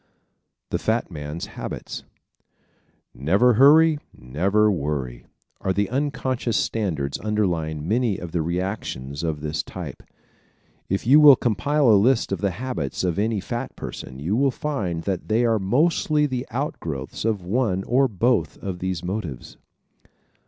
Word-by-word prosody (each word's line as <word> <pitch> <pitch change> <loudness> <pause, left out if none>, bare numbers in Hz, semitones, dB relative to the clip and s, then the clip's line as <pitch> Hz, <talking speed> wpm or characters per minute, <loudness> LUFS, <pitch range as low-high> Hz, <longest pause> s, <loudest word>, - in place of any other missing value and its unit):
The - - 0
Fat 110 -2 -1
Man's 75 +1 -5
Habits - - -7 1.1
¶ - - -15
"Never 100 - +4
hurry 150 +5 +6 0.2
and 65 +1 -15
never 100 +7 +3
worry" 70 -8 -3 0.3
are 95 - -1
the 100 +1 -1
unconscious 130 -4 -1
standards 80 -11 -1
underlying 85 -8 -1
many 110 -1 +1
of 90 -2 -7
the 85 - 0
reactions 85 -6 -3
of 80 -3 -2
this 75 +1 -2
type. - - -8 0.9
If 95 +3 -1
you 140 +6 +7
will 145 -3 +9
compile 140 +5 +1
a 105 -4 +6
list 120 -1 +2
of 95 - -2
the 100 - +2
habits 110 - -3
of 90 0 0
any 110 0 +1
fat 120 +6 -5
person 65 - -7
you 85 +9 -1
will 135 +3 +3
find 105 - -3
that 95 -2 -3
they 115 +3 +2
are 115 -2 +2
mostly 150 - +2
the 130 -2 -3
outgrowths 85 - -4
of 110 -4 0
one 95 -2 0
or 130 +5 +3
both 115 +2 0
of 95 -3 -5
these 95 -2 -3
motives. 90 - -5
100 Hz, 150 wpm, -23 LUFS, 85-125 Hz, 1.1 s, will